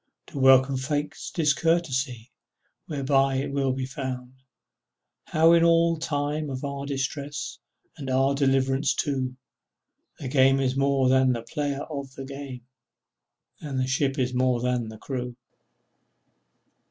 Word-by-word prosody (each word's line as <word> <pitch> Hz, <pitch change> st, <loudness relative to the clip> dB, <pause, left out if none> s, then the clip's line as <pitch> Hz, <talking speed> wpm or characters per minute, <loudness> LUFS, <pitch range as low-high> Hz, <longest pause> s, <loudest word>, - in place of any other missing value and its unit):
Then 140 Hz, -, -3 dB
welcome 130 Hz, 0 st, +6 dB
Fate's 145 Hz, +3 st, -3 dB
discourtesy 140 Hz, -6 st, 0 dB, 0.6 s
Whereby 135 Hz, -2 st, +1 dB
it 135 Hz, +1 st, -1 dB
is -, -, -7 dB
made 135 Hz, -2 st, -1 dB
clear, 130 Hz, -2 st, -4 dB, 1.0 s
How 165 Hz, +2 st, +4 dB
in 170 Hz, 0 st, +5 dB
all 165 Hz, -1 st, +4 dB
time 150 Hz, -1 st, -2 dB
of 130 Hz, +1 st, -4 dB
our 140 Hz, 0 st, -4 dB
distress, 140 Hz, +1 st, -4 dB, 0.4 s
And 135 Hz, -3 st, -6 dB
in 130 Hz, -, +1 dB
our 135 Hz, +1 st, +3 dB
triumph 135 Hz, 0 st, +2 dB
too, 130 Hz, -3 st, -1 dB, 0.8 s
The 140 Hz, -, -6 dB
game 135 Hz, 0 st, +4 dB
is 130 Hz, -1 st, 0 dB
more 135 Hz, -1 st, +2 dB
than 130 Hz, 0 st, +4 dB
the 115 Hz, -1 st, -4 dB
player 145 Hz, +2 st, -3 dB
of 140 Hz, -3 st, -7 dB
the 135 Hz, -, -7 dB
game, 135 Hz, -3 st, -8 dB, 0.9 s
And 140 Hz, -3 st, -4 dB
the 130 Hz, -, +1 dB
ship 135 Hz, +2 st, 0 dB
is 125 Hz, -1 st, 0 dB
more 125 Hz, -1 st, +2 dB
than 125 Hz, -2 st, -1 dB
the 110 Hz, -, -10 dB
crew! 125 Hz, 0 st, -5 dB
135 Hz, 140 wpm, -26 LUFS, 130-145 Hz, 1.0 s, welcome